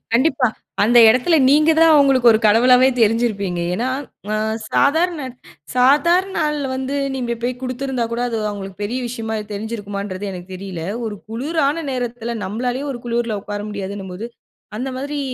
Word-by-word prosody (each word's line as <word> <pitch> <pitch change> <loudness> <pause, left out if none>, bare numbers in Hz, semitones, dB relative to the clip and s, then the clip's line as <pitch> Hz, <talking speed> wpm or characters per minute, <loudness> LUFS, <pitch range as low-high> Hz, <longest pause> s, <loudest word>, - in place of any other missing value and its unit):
கண்டிப்பா 265 +1 +3 0.4
அந்த 240 +3 +5
இடத்தில 255 +9 +4
நீங்க 305 +3 +5
தான் 325 -1 +6
அவங்களுக்கு 270 -4 +5
ஒரு 220 - +4
கடவுளாவே 250 +4 +6
தெரிஞ்சிருப்பீங்க. 210 -5 +1
ஏன்னா, 240 +6 -1 0.4
அ - - 0 0.4
சாதாரண, 320 +3 +2 0.5
சாதாரண 335 +9 +3
நாள்ல 300 -3 0
வந்து 265 +2 -3 0.2
நீங்க 245 -3 -2
போய் 250 +1 -1
கொடுத்திருந்தா 255 -1 -2
கூட 235 - -2
அது 230 -2 -2
அவங்களுக்கு 195 -1 -8
பெரிய 235 +5 -2
விஷயமா 225 -2 -4 0.2
தெரிஞ்சிருக்குமா 205 -1 -5
என்றது 195 0 -5
எனக்கு 180 0 -9
தெரியல. 185 -3 -6 0.2
ஒரு 210 - -5
குளுரான 295 +5 -1
நேரத்தில 240 -2 -3
நம்மளாலேயே 245 +7 -3
ஒரு 240 - -8
குளுருல 235 -2 -1
உட்கார 205 0 -5
முடியாதுன்னும் 195 -2 -6
போது, 210 +6 -6 0.5
அந்த 255 +3 -3
மாதிரி 285 +2 -4
240 Hz, 150 wpm, -20 LUFS, 210-275 Hz, 0.5 s, தான்